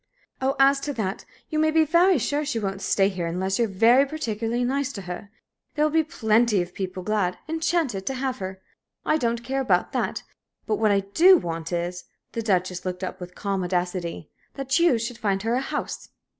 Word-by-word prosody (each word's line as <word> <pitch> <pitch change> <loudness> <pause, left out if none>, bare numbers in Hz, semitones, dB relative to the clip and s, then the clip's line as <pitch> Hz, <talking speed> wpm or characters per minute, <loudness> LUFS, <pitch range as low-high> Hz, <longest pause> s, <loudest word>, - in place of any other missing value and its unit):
"Oh, 270 +1 +1
as 275 0 +5
to 290 +1 -3
that, 205 -5 -3 0.2
you 310 - -1
may 315 0 +3
be 315 0 +4
very 345 +3 +4
sure 290 +4 0
she 285 -5 -2
won't 195 -2 -3
stay 195 -1 +3
here 185 -4 -3
unless 190 +4 -1
you're 235 - +3
very 230 +7 +5
particularly 240 -5 -2
nice 275 +2 0
to 200 - -7
her. 180 +3 -7 0.5
There'll 300 0 +2
be 320 +1 +4
plenty 225 - +2
of 175 0 -12
people 185 -1 -5
glad 200 -3 0
enchanted 320 - -1
to 270 - -1
have 260 -1 -2
her! 190 0 -6 0.4
I 310 - +3
don't 235 -4 -1
care 270 +2 -1
about 260 - +1
that, - - -2 0.4
but 215 - 0
what 220 -1 +2
I 200 -1 +3
do 340 - +6
want 165 - -4
is" 175 +1 -3 0.3
the 230 - -3
Duchess 185 -4 0
looked 185 0 -4
up 185 0 -4
with 180 0 -8
calm 195 -2 -2
audacity 175 -2 -3 0.2
"that 275 +2 0
you 340 -8 +4
should 235 +1 -4
find 195 -2 0
her 225 +1 0
a 255 - +1
house." - - -4
225 Hz, 200 wpm, -25 LUFS, 190-275 Hz, 0.5 s, do